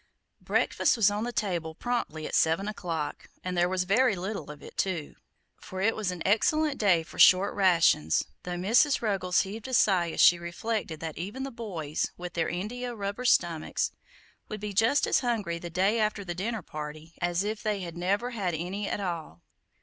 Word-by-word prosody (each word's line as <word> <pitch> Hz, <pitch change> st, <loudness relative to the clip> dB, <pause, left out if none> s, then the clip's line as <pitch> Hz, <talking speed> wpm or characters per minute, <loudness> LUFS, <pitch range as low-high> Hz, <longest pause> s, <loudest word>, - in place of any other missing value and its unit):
Breakfast -, -, +1 dB
was 205 Hz, -3 st, +4 dB
on 210 Hz, +2 st, -2 dB
the 245 Hz, -, -3 dB
table 170 Hz, -8 st, -2 dB
promptly 235 Hz, -11 st, -3 dB
at -, -, -6 dB
seven 165 Hz, +5 st, +2 dB
o'clock, 170 Hz, -7 st, -4 dB
and 185 Hz, 0 st, -3 dB
there 175 Hz, 0 st, +2 dB
was 185 Hz, 0 st, 0 dB
very 215 Hz, +4 st, +3 dB
little 190 Hz, -3 st, -5 dB
of 150 Hz, -1 st, -10 dB
it, -, -, -11 dB
too; 175 Hz, -6 st, -2 dB, 0.4 s
for 185 Hz, -, -8 dB
it 215 Hz, +4 st, +2 dB
was 210 Hz, -4 st, -2 dB
an 180 Hz, -2 st, -4 dB
excellent 295 Hz, +8 st, +2 dB
day 180 Hz, -6 st, +4 dB
for 160 Hz, -, -12 dB
short 185 Hz, +2 st, +6 dB
rations, 165 Hz, -, +3 dB, 0.2 s
though 180 Hz, 0 st, -4 dB
Mrs. 235 Hz, -, +3 dB
Ruggles 190 Hz, -4 st, +2 dB
heaved 210 Hz, +5 st, -6 dB
a 260 Hz, -, 0 dB
sigh 180 Hz, -6 st, +3 dB
as -, -, -6 dB
she 175 Hz, -, +7 dB
reflected 170 Hz, -1 st, -4 dB
that 160 Hz, -1 st, -5 dB
even 205 Hz, +10 st, -5 dB
the 275 Hz, -, -5 dB
boys, 175 Hz, -, -3 dB
with 175 Hz, -1 st, -7 dB
their 165 Hz, -2 st, 0 dB
India 240 Hz, +7 st, -4 dB
rubber 205 Hz, +4 st, -4 dB
stomachs, 170 Hz, -8 st, +1 dB, 0.6 s
would 215 Hz, -, -5 dB
be 210 Hz, 0 st, -5 dB
just 225 Hz, +8 st, +3 dB
as -, -, +3 dB
hungry 215 Hz, -9 st, -1 dB
the 175 Hz, -, -7 dB
day 190 Hz, +6 st, +1 dB
after 210 Hz, -2 st, 0 dB
the 175 Hz, -, -3 dB
dinner 205 Hz, +3 st, -3 dB
party 155 Hz, +2 st, -8 dB
as 175 Hz, +2 st, +1 dB
if 215 Hz, +1 st, -3 dB
they 210 Hz, -2 st, -1 dB
had 170 Hz, -2 st, -6 dB
never 200 Hz, +8 st, 0 dB
had 190 Hz, -8 st, -2 dB
any 185 Hz, +5 st, -3 dB
at -, -, -2 dB
all. 170 Hz, -, -5 dB
190 Hz, 195 wpm, -28 LUFS, 170-215 Hz, 0.6 s, she